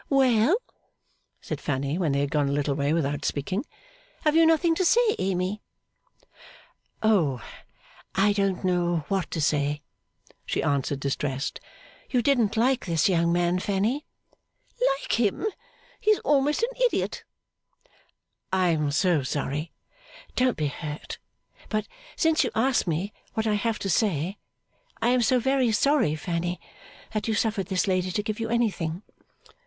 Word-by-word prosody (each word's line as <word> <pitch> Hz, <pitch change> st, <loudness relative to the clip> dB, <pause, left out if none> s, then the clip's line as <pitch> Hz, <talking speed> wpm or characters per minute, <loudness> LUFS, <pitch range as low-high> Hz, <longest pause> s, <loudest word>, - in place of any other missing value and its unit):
'Well?' 265 Hz, -, +4 dB, 0.8 s
said -, -, -5 dB
Fanny, 140 Hz, +3 st, -1 dB
when 165 Hz, -6 st, +1 dB
they 140 Hz, -, +1 dB
had 140 Hz, -1 st, -1 dB
gone 145 Hz, -2 st, +1 dB
a -, -, 0 dB
little 145 Hz, 0 st, 0 dB
way 140 Hz, +1 st, 0 dB
without 145 Hz, -3 st, 0 dB
speaking. 185 Hz, -, -1 dB, 0.6 s
'Have 305 Hz, 0 st, +3 dB
you 330 Hz, 0 st, +6 dB
nothing 325 Hz, +1 st, +4 dB
to 370 Hz, -, 0 dB
say, 455 Hz, +4 st, +4 dB
Amy?' 190 Hz, +2 st, -1 dB, 1.4 s
'Oh, 170 Hz, -, +3 dB, 0.8 s
I 205 Hz, +2 st, +4 dB
don't 195 Hz, -2 st, 0 dB
know 175 Hz, -3 st, +1 dB
what 190 Hz, -4 st, 0 dB
to 165 Hz, -, -3 dB
say!' 145 Hz, -1 st, 0 dB, 0.6 s
she -, -, -2 dB
answered, 140 Hz, -1 st, 0 dB
distressed. 135 Hz, 0 st, -2 dB, 0.5 s
'You 250 Hz, -4 st, +1 dB
didn't 230 Hz, -6 st, +2 dB
like 250 Hz, -1 st, +2 dB
this 165 Hz, -3 st, +2 dB
young 170 Hz, -2 st, +2 dB
man, 175 Hz, +1 st, +2 dB
Fanny?' 210 Hz, +10 st, -1 dB, 0.7 s
'Like 275 Hz, -, +1 dB
him? 220 Hz, -, +1 dB, 0.5 s
He 430 Hz, -, 0 dB
is 425 Hz, -, +5 dB
almost 290 Hz, +6 st, +2 dB
an 475 Hz, -, +1 dB
idiot.' -, -, 0 dB, 1.3 s
'I 185 Hz, -1 st, +2 dB
am 155 Hz, -3 st, +1 dB
so 165 Hz, 0 st, +2 dB
sorry 145 Hz, +4 st, -3 dB, 0.6 s
don't 255 Hz, -1 st, +2 dB
be 155 Hz, -, 0 dB
hurt 150 Hz, +1 st, -7 dB, 0.5 s
but, 215 Hz, -1 st, -1 dB, 0.3 s
since 320 Hz, -1 st, +3 dB
you 250 Hz, -, 0 dB
ask 245 Hz, -2 st, +2 dB
me 175 Hz, +5 st, -2 dB, 0.2 s
what 220 Hz, -, 0 dB
I 215 Hz, -, +2 dB
have 220 Hz, +2 st, 0 dB
to -, -, -4 dB
say, 185 Hz, -1 st, 0 dB, 0.6 s
I 230 Hz, -, +2 dB
am 250 Hz, 0 st, +3 dB
so 250 Hz, +2 st, +3 dB
very 265 Hz, -1 st, +2 dB
sorry, 220 Hz, -, +2 dB
Fanny, 175 Hz, +2 st, -3 dB, 0.5 s
that 215 Hz, 0 st, -2 dB
you 220 Hz, -, +1 dB
suffered 210 Hz, -4 st, 0 dB
this 190 Hz, +2 st, 0 dB
lady 185 Hz, -1 st, +1 dB
to 210 Hz, -, -1 dB
give 215 Hz, +1 st, -3 dB
you 225 Hz, -, -2 dB
anything. 200 Hz, -7 st, -1 dB
195 Hz, 150 wpm, -26 LUFS, 155-240 Hz, 1.4 s, you